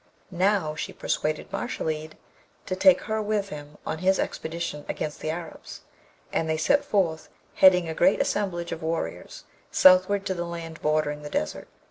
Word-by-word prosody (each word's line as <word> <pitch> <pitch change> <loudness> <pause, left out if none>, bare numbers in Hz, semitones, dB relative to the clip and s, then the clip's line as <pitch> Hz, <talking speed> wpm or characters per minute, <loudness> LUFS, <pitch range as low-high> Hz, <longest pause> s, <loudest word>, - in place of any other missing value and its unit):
Now, 185 -3 +1
she - - -5
persuaded 155 0 -2
Mashalleed 155 -9 -3 0.5
to 185 - -2
take 185 -1 +5
her 220 0 -2
with 210 -1 -1
him 150 -1 -9
on 160 - -3
his 190 +2 +3
expedition 160 -2 -3
against 150 -1 -4
the 155 - -3
Arabs; 165 0 -7 0.5
and 160 - 0
they 160 - +1
set 280 - +3
forth, 185 - 0 0.2
heading 180 -2 +6
a 160 - -3
great 180 +4 +3
assemblage 175 -4 -1
of - - -5
warriors, 160 +1 -4 0.3
southward 185 +2 +5
to 190 - 0
the 175 -1 -3
land 165 -1 -7
bordering 150 -1 0
the 150 - -7
Desert. 75 - -3
170 Hz, 160 wpm, -26 LUFS, 155-190 Hz, 0.5 s, heading